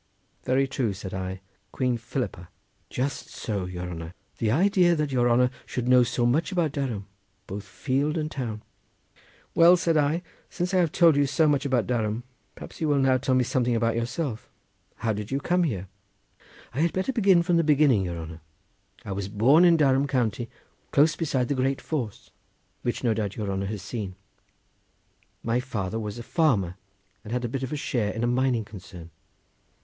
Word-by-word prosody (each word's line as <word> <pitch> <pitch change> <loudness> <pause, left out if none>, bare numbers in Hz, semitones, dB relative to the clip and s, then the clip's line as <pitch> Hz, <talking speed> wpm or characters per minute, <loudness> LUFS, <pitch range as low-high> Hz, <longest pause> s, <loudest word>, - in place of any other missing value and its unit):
"Very 135 +2 +2
true," 125 -5 -1
said 95 -1 -7
I; 95 0 -4 0.3
"Queen 125 -2 0
Philippa." 115 -7 -4 0.4
"Just 135 +3 -3
so, 100 -5 -3
your 90 0 -5
honour! 85 0 -7 0.2
the 110 - +1
idea 175 - +4
that 150 -2 -1
your 120 -2 +2
honour 125 +1 +4 0.2
should 125 -1 -3
know 125 0 +6
so 120 0 +1
much 145 +11 +1
about 170 -5 +1
Durham, 125 -9 -3 0.4
both 100 +1 -6
field 140 +8 -1
and 155 -1 -2
town!" 115 -6 -4 0.9
"Well," 170 +2 +7
said 165 -2 +1
I, 150 +4 +1 0.3
"since 180 +1 -3
I - - +4
have 170 -4 +2
told 165 -3 +5
you 145 -1 +3
so 155 +4 +3
much 145 -1 +2
about 125 -4 +1
Durham, 115 -1 -1 0.3
perhaps - - -11
you 160 - +1
will 145 -1 +3
now 135 -1 +4
tell 130 0 +1
me 130 - +4
something 125 -2 +1
about 115 0 +1
yourself. 115 +1 -3 0.5
How 110 -1 -1
did 105 +1 -5
you 135 - -1
come 175 +4 +1
here?" 95 - -3 0.9
"I 130 - -3
had 165 +1 +2
better 190 +8 -1
begin 195 -7 +4
from 175 0 +2
the 165 - +3
beginning, 145 -9 +4
your 85 -1 -4
honour. 80 0 -8 0.6
I - - -5
was 95 0 -3
born 125 - +5
in 170 -2 +6
Durham 140 -2 +3
county 120 -3 -1 0.4
close 150 +2 +4
beside 135 -6 0
the 145 - 0
Great 135 0 0
Force, 125 -10 -4 0.5
which 120 - -2
no 115 -2 +3
doubt 105 -2 -3
your 105 -3 -3
honour 95 0 -2
has 105 -2 -5
seen. 100 -3 -5 1.3
My 115 +1 +1
father 110 -5 -3
was 105 -1 -5
a 120 - -6
farmer 115 - +1 0.5
and 105 - -9
had 125 0 -1
a - - 0
bit 130 +3 -4
of 130 - -4
a - - -1
share 120 -7 -1
in 115 - -3
a - - +3
mining 125 -2 +1
concern. 90 -5 -11
125 Hz, 190 wpm, -26 LUFS, 105-145 Hz, 1.3 s, Well